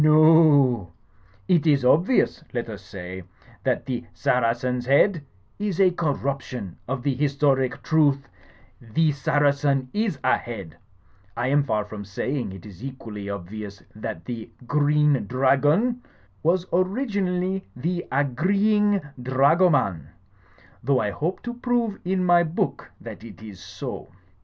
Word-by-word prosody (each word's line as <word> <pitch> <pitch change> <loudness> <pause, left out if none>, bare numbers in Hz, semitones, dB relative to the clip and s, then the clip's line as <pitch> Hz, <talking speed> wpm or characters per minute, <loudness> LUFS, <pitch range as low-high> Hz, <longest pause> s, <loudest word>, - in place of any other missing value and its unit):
No 155 0 +6
o. 145 - +5 0.5
It 170 -2 +3
is 140 -4 +3
obvious, 170 - +3
let 120 -2 -2
us 105 -3 -7
say, 95 -2 -8 0.4
that - - 0
the 125 -2 -3
'Saracen's 125 -1 0
Head' 150 +4 +3 0.4
is 200 -4 -2
a 190 -2 +5
corruption 135 - -3
of 130 0 -3
the 140 -1 +1
historic 140 -1 +1
truth 145 -4 +2 0.5
'The 150 +8 +1
Saracen 140 -1 +1
is 210 -7 0
Ahead' 100 -9 -1 0.3
— 95 +1 -31
^I 125 +2 0
am 145 +1 +4
far 110 -6 -1
from 105 0 -8
saying 120 +4 -3
it 95 0 -11
is 100 0 -12
equally 110 -7 -7
obvious 100 +1 -7
that 85 -5 -6
the 115 0 -6 0.2
'Green 145 -3 +2
Dra 130 +3 +3
gon' 205 - +1 0.4
was 175 +3 +2
originally 190 -2 0
'the 175 +8 -2
Agreeing 195 - +2 0.2
Dragoman'; 130 - +2 0.8
though 130 +1 +2
I 105 -1 0
hope 160 - -3
to 240 - -4
prove 240 -3 -1
in 185 0 0
my 175 -1 +5
book 165 -1 -2
that - - -9
it 115 -1 -12
is 105 -4 -10
so. - - -7
140 Hz, 135 wpm, -24 LUFS, 115-170 Hz, 0.8 s, No